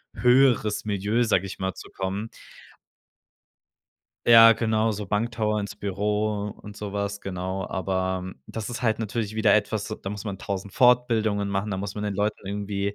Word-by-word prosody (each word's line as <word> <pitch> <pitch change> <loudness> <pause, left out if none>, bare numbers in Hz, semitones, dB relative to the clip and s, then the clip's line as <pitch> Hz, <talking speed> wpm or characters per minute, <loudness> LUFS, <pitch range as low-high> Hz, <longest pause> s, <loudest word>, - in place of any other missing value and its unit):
höheres 125 -4 +3
Milieu, 105 +3 0
sage 100 -4 +2
ich 95 - -7
mal, 95 0 -2
zu - - -11
kommen. 100 +4 -4 2.0
Ja, 115 -1 +9
genau, 110 0 +1
so 105 0 -4
Banktower 105 0 0
ins 100 0 -6
Büro 105 +1 -1
und 105 -1 -10
so 105 -1 -6
was, 100 0 -3
genau. 95 0 -4
Aber 95 0 -2
das 110 0 -5
ist 120 +1 -5
halt 110 -2 +1
natürlich 110 -1 -3
wieder 110 -2 +3
etwas, 105 0 0
d 110 - -5
da 95 - -4
muss 105 +1 -6
man 100 -2 -4
1.000 100 -1 -5
Fortbildungen 115 -5 +3
machen, 100 +1 -2
da 95 - -2
muss 100 +1 -5
man 105 - -4
den 100 -2 -2
Leuten 105 -1 -1
irgendwie, 100 0 -3
105 Hz, 170 wpm, -25 LUFS, 100-110 Hz, 2.0 s, Ja